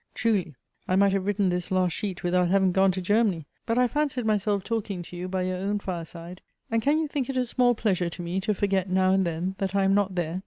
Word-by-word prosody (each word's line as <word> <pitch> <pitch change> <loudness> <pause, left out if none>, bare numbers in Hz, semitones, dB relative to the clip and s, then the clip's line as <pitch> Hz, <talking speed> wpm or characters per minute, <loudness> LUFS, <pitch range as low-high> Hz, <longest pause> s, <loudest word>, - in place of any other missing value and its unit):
Truly! 195 - 0 0.3
I 185 - +1
might 200 +1 +4
have 195 0 -1
written 205 -2 +1
this 180 0 -1
last 185 -1 +1
sheet 190 -2 -4
without 180 0 +2
having 190 0 +3
gone 190 +1 +4
to 185 - -3
Germany; 205 -5 +1 0.2
but 230 0 0
I 250 0 +4
fancied 280 -3 -1
myself 205 -2 +1
talking 205 -5 -3
to 175 - -11
you 180 +1 -4
by 185 0 -2
your 185 0 -2
own 200 +3 -1
fireside, 175 -2 -7 0.3
and 230 0 +2
can 285 +5 +2
you 315 -1 0
think 280 -3 -3
it 265 - -2
a 255 - +1
small 245 0 +2
pleasure 185 -6 0
to 175 - -8
me 175 +3 -2
to 210 +1 0
forget 195 -1 0
now 185 0 +3
and 190 -2 +2
then, 170 +3 -2
that 195 0 -2
I 195 - +3
am 195 0 +3
not 200 -2 +1
there? 175 0 -2
190 Hz, 250 wpm, -26 LUFS, 180-215 Hz, 0.3 s, might